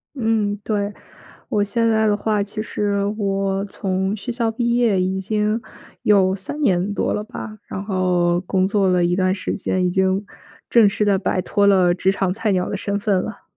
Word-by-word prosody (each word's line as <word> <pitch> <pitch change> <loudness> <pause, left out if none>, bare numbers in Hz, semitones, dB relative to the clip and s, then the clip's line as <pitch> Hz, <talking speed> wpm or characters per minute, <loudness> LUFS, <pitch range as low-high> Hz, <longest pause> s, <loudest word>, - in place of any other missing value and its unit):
嗯， 220 -4 0
对。 205 -1 -1 0.6
我 210 - +1
现 230 +3 0
在 220 -1 +2
的 205 -1 +2
话， 210 -1 0
其 205 +1 -5
实 205 -2 -1 0.2
我 195 -1 -1
从 190 0 -2
学 205 - -6
校 230 -2 0
毕 235 +1 0
业 220 -6 +2
已 190 +1 0
经 210 +3 0 0.4
有 190 -2 +4
3 200 +10 -6
年 195 -6 +1
多 - - 0
了 210 - -2
吧， 215 -2 -8
然 195 - -5
后 180 -3 +1
工 185 0 +1
作 200 -1 +2
了 180 -1 +3
一 175 +1 +2
段 185 0 +2
时 190 - -3
间， 185 -2 -1
已 - - +1
经 190 +2 +1 0.5
正 230 -4 +6
式 205 +1 -1
地 200 -2 +3
摆 185 -1 0
脱 200 +2 +1
了 185 -3 +4
职 190 +1 +1
场 190 -2 0
菜 215 +1 -1
鸟 185 -1 0
的 - - -2
身 200 +1 -2
份 200 -3 +1
了。 220 - -7
200 Hz, 210 characters per minute, -21 LUFS, 190-215 Hz, 0.6 s, 正